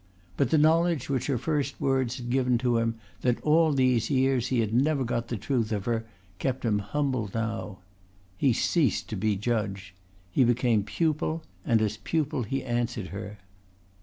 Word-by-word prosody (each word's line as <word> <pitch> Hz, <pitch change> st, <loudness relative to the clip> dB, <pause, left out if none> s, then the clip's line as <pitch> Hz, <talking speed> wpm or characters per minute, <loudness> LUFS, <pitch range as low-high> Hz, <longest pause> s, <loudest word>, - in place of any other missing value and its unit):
But 135 Hz, +2 st, +1 dB
the 160 Hz, -, +3 dB
knowledge 160 Hz, -2 st, +3 dB
which 130 Hz, -3 st, -1 dB
her 135 Hz, -3 st, +1 dB
first 140 Hz, +1 st, -2 dB
words 130 Hz, -2 st, 0 dB
had 120 Hz, -1 st, -5 dB
given 125 Hz, -1 st, +2 dB
to 120 Hz, -1 st, +1 dB
him, 115 Hz, 0 st, 0 dB, 0.3 s
that 125 Hz, -1 st, +1 dB
all 160 Hz, +1 st, +4 dB
these 130 Hz, -4 st, +2 dB
years 130 Hz, -2 st, +2 dB
he 125 Hz, -2 st, +1 dB
had 110 Hz, -1 st, 0 dB
never 140 Hz, +3 st, +2 dB
got 120 Hz, -1 st, -2 dB
the 120 Hz, -, -3 dB
truth 115 Hz, -1 st, -1 dB
of 105 Hz, -3 st, -2 dB
her, 115 Hz, -1 st, -1 dB, 0.3 s
kept 130 Hz, -2 st, -2 dB
him 105 Hz, -2 st, +2 dB
humble 130 Hz, -1 st, -1 dB
now. 110 Hz, -4 st, -3 dB, 0.5 s
He 130 Hz, +7 st, +2 dB
ceased 140 Hz, +3 st, +1 dB
to 110 Hz, -, -3 dB
be 105 Hz, +1 st, 0 dB
judge. 100 Hz, -3 st, -2 dB, 0.4 s
He 130 Hz, -, +4 dB
became 120 Hz, -2 st, +3 dB
pupil 160 Hz, +4 st, -1 dB, 0.2 s
and 115 Hz, -5 st, +2 dB
as 105 Hz, 0 st, -1 dB
pupil 150 Hz, 0 st, -1 dB
he 135 Hz, +4 st, -2 dB
answered 120 Hz, -5 st, -2 dB
her. 100 Hz, +1 st, -7 dB
120 Hz, 175 wpm, -27 LUFS, 110-135 Hz, 0.5 s, all